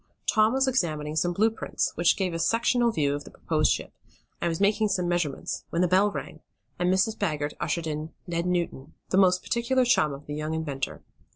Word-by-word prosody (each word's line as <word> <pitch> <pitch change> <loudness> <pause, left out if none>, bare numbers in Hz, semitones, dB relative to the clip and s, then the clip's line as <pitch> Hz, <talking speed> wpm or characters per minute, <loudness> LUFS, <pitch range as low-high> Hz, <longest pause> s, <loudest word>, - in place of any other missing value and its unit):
Tom 215 +1 +4
was 265 0 +2
examining 155 -11 -1
some 175 +2 +1
blue 215 +6 +2
prints, 225 - -2
which 170 +1 +3
gave 185 -3 -1
a 165 - -3
sectional 235 +6 +2
view 145 -8 +1
of 145 0 -4
the - - -12
proposed - - 0
ship, - - -3 0.5
and 170 - +1
was 165 - -2
making 210 +2 +3
some 185 -3 0
measurements 175 -6 -2
when 170 - +1
the - - +3
bell 190 +4 +4
rang, - - -7 0.4
and 180 0 +2
Mrs. 190 +4 +2
Baggert 150 -8 -2
ushered 170 -1 -1
in 155 0 -4
Ned 170 0 -2
Newton, 170 -6 -2
the 190 - +3
most 185 -1 +4
particular 250 +2 +1
chum 155 -11 +3
of 140 +1 -9
the 145 - -6
young 155 +1 -3
inventor. 145 -4 -4
175 Hz, 205 wpm, -27 LUFS, 155-210 Hz, 0.5 s, Tom